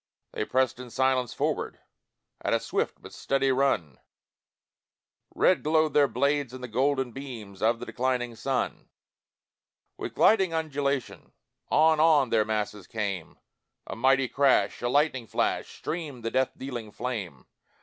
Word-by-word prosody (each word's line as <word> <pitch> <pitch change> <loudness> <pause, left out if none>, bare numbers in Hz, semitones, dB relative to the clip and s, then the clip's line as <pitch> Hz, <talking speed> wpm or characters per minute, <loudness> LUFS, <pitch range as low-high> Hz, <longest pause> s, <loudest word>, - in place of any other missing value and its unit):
They - - -3
pressed 130 0 +1
in 125 -1 -8
silence 130 -1 +1
forward - - -2 0.7
At - - +2
a - - +1
swift - - -3
but - - -11
steady 135 0 +1
run, 130 - 0 1.4
Red 185 - +3
glowed 155 -1 +2
their 145 -1 +5
blades 140 -3 0
in 130 - -9
the 125 - -5
golden 130 +2 0
beams 115 -7 -9
Of 115 +2 +3
the - - -6
declining 125 -2 -1
sun; 130 +3 -2 1.1
With - - -5
gliding 190 -6 +4
undulation, 140 -4 -2 0.4
On, 160 0 +4
on 155 -6 +4
their 110 -2 +3
masses 105 -3 -3
came 100 -6 -4 0.5
A - - -6
mighty 135 +2 +3
crash 130 -7 +2
a 120 - 0
lightning 135 -3 +1
flash - - -1
Streamed 150 -8 -5
the 115 - -1
death 130 0 +2
dealing 120 -5 -6
flame. 100 - -5
130 Hz, 140 wpm, -27 LUFS, 115-140 Hz, 1.4 s, their